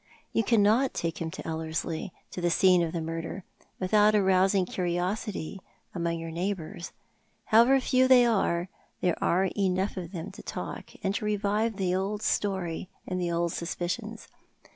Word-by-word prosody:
" - - -37
You 225 - +2
cannot 225 +4 +3
take 165 -1 -3
him 165 - -2
to - - -8
Ellerslie, 160 +3 -3 0.2
to 180 - -5
the 175 - +2
scene 180 +1 +5
of 165 -1 -1
the 170 - -3
murder, 165 +3 -5 0.4
without 210 +3 +4
arousing 190 -1 +3
curiosity 180 +1 -2 0.3
among 170 -2 -1
your 165 0 -6
neighbours. 175 -1 -4 0.5
However 240 +5 +6
few 260 0 +3
they 250 -2 +7
are, 190 -6 +1 0.3
there 180 -2 0
are 185 +2 +2
enough 190 0 0
of 175 -2 -5
them 170 -4 -6
to - - -11
talk, - - -6
and 195 0 +1
to 210 - -3
revive 210 +2 0
the 185 -2 0
old 200 +3 -1
story 190 -5 -1 0.2
and 185 0 -3
the 175 -1 -1
old 170 0 0
suspicions. 195 +6 -4
185 Hz, 165 wpm, -28 LUFS, 170-210 Hz, 0.5 s, they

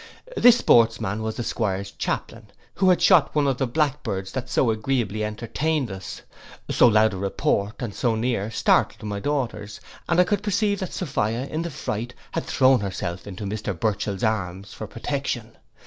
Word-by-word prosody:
This 245 -1 +7
sportsman 110 - +3
was 110 0 -3
the 120 - -3
'Squire's 100 -4 -2
chaplain, - - -4 0.3
who 190 -1 +3
had 180 - +3
shot 170 -8 +5
one 150 -1 +3
of 135 -2 0
the 135 - +1
blackbirds 120 -9 -1
that 130 -2 -4
so 120 - +2
agreeably 110 -2 -1
entertained 120 +5 -2
us. 95 -1 -8 0.5
So - - +6
loud 110 -1 +4
a - - -4
report, 100 +2 -1
and 110 -4 -4
so 120 0 0
near, 110 -2 -1
startled 115 - +2
my 100 -1 -3
daughters; 115 -6 -3 0.3
and - - +3
I - - +8
could 200 +2 0
perceive 205 0 0
that 185 - -4
Sophia 125 - -1
in 155 +3 -3
the 170 - -3
fright 120 -4 -4 0.2
had - - -3
thrown 130 -1 +4
herself 95 -2 -4
into 100 +1 -7
Mr 100 -3 -4
Burchell's 100 -3 -1
arms 100 -3 -2
for - - -7
protection. - - -4
115 Hz, 175 wpm, -24 LUFS, 100-140 Hz, 0.5 s, I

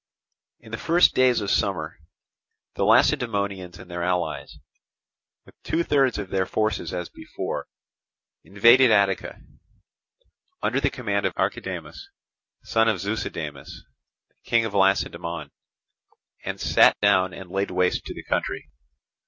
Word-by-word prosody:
In 110 - -15
the 110 - -5
first 170 +2 +4
days 125 -3 +3
of 100 - -2
summer 85 -6 -1 0.7
the - - -2
Lacedaemonians 100 -6 +1
and 90 - -13
their 85 0 -4
allies, 85 -4 -2 0.9
with - - -18
two 165 +1 -1
thirds 135 -5 +2
of 100 -3 -6
their 95 -1 0
forces 110 -6 -1
as 90 -1 -4
before, - - -6 0.8
invaded 115 +6 +5
Attica, 100 -3 +1 1.2
under - - 0
the - - +2
command - - -1
of - - -6
Archidamus, 395 - -4 0.5
son 110 0 +2
of 110 -4 +2
Zeuxidamus, 85 -5 -5 0.6
King 115 -1 +2
of 110 - -5
Lacedaemon, 95 -4 0 0.9
and - - -5
sat - - +4
down 95 -3 +3
and 90 -1 -10
laid 95 +1 -1
waste 90 0 0
the - - -8
country. 75 - -3
100 Hz, 125 wpm, -24 LUFS, 90-110 Hz, 1.2 s, invaded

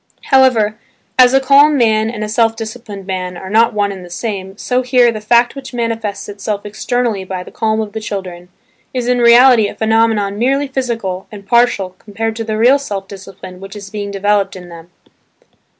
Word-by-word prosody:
However, 235 -5 +3 0.4
as 250 -1 +7
a - - +6
calm 280 +2 +5
man 220 -2 +2
and 220 -2 -5
a - - -3
self 225 +1 +1
disciplined 220 -3 -8
man 185 -2 -4
are 190 +1 -8
not 230 +2 +4
one 205 -1 0
and 190 -2 -8
the 175 - -12
same, 195 0 -5
so 250 +3 -1
here 245 -1 +3
the 215 -2 -6
fact 235 +3 +3
which 265 -2 -9
manifests 225 -3 -3
itself 205 0 -5
externally 220 0 -2
by 185 -1 -5
the - - -13
calm 220 -1 -1
of 210 -2 -6
the 220 - -4
children 185 -4 -6 0.5
is 245 -1 -2
in 250 0 +2
reality 240 -1 +6
a - - -8
phenomenon 220 -2 +1
merely 275 +4 +1
physical 230 -8 -3
and 205 -2 -11
partial 235 -4 +2
compared 220 +2 -4
to 225 - -3
the 215 -1 -3
real 250 +5 +4
self 200 -8 -5
discipline 190 -2 -11
which 195 +2 -10
is 200 -1 -9
being 205 -1 -5
developed 200 0 0
in 180 -1 -10
them. 170 0 -12
215 Hz, 195 wpm, -15 LUFS, 195-240 Hz, 0.5 s, as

